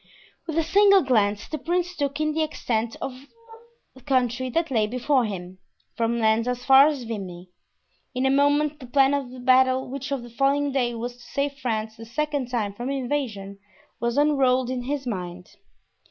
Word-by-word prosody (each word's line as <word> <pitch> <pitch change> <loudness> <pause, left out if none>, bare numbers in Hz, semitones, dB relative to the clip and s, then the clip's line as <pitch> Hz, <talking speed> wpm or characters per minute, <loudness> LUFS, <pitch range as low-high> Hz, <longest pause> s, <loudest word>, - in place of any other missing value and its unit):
With 320 -1 -3
a 330 - +3
single 395 +3 +5
glance 210 -5 +1
the 310 - -5
prince 355 +1 -1
took 285 -1 -2
in 305 0 0
the 320 - 0
extent 235 -7 -2
of 265 +1 -7 0.8
country 255 -1 +1
that 325 +3 -1
lay 220 -4 +2
before 250 +2 +1
him, 185 -3 -6 0.4
from 230 0 0
Lens 225 +1 +2
as 250 0 -3
far 270 +1 +8
as 290 -5 -2
Vimy. 185 -6 -7 0.6
In 255 +1 0
a 265 - +3
moment 290 +2 +2
the 255 - -10
plan 270 +2 +3
of 280 -3 -1
the 255 +1 -10
battle 260 +1 +3
which 275 +1 -5
on 270 -3 -2
the 240 - -11
following 280 +3 +1
day 245 -3 0
was 240 +1 -5
to - - -18
save 280 +3 -2
France 220 -3 -3
the 225 - -9
second 285 +1 -2
time 220 -5 -2
from 240 +5 -5
invasion 245 -8 -3 0.4
was 235 +2 -1
unrolled 260 -4 +3
in 250 -1 -3
his 280 0 -3
mind. 180 -5 -5
255 Hz, 185 wpm, -24 LUFS, 230-285 Hz, 0.8 s, far